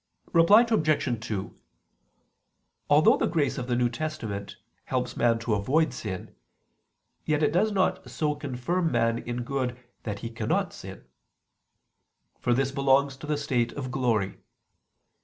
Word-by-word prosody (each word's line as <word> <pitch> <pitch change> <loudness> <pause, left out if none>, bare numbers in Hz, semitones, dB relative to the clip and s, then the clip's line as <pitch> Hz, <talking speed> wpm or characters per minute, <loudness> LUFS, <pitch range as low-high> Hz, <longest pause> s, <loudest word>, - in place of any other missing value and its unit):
Reply 200 +8 +7
Obj. 155 - +1
2: 100 -4 -4 1.3
Although 150 +2 +6
the - - +1
grace 150 -6 0
of 125 - -5
the 125 - 0
New 120 0 +2
Testament 115 -6 -5 0.3
helps - - -2
man 115 -1 +3
to 115 -1 -2
avoid 130 +10 +1
sin, 105 -7 -6 0.9
yet 155 0 0
it 145 - +3
does 210 +5 +2
not 190 -2 0
so 150 -2 -1
confirm 145 +5 -2
man 115 -1 +1
in 120 0 -4
good 125 -1 -2 0.2
that 100 -2 -5
he 115 - -5
cannot 115 - -1
sin: - - -10 1.3
for 120 - 0
this 135 +1 +1
belongs 135 0 +2
to 150 - -9
the 150 -1 0
state 125 -5 0
of 130 -3 -5
glory. 115 -6 0
130 Hz, 140 wpm, -27 LUFS, 120-155 Hz, 1.3 s, Reply